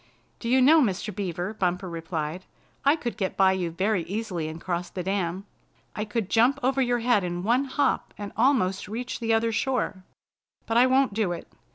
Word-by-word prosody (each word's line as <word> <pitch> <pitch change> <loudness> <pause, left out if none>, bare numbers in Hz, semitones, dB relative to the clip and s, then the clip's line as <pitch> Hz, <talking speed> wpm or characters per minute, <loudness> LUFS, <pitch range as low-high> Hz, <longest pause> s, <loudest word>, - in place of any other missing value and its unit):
"Do 230 - -4
you 260 +1 +5
know, 310 +4 +7
Mr. 205 -3 -1
Beaver," 185 0 -3
Bumper 185 -2 -1
replied, 165 0 -4 0.4
"I 280 +2 +5
could 240 - -5
get 190 -2 -2
by 190 -1 +5
you 185 -2 -1
very 190 +3 0
easily 190 -5 -3
and 160 +1 -6
cross 175 0 -3
the 180 - -5
dam? 190 0 -2 0.5
I 210 - -2
could 210 -1 -2
jump 245 +7 +3
over 265 +1 +2
your 245 -2 +1
head 230 -4 +3
in 175 0 -3
one 245 +6 +2
hop 280 +2 0
and 205 -1 -6
almost 220 -8 +2
reach 245 +5 -4
the 230 -1 -1
other 225 +1 +2
shore. 225 -5 -1 0.6
But 230 - 0
I 250 +2 +6
won't 260 -3 +3
do 200 -4 0
it! 170 - -8
205 Hz, 195 wpm, -26 LUFS, 180-245 Hz, 0.6 s, know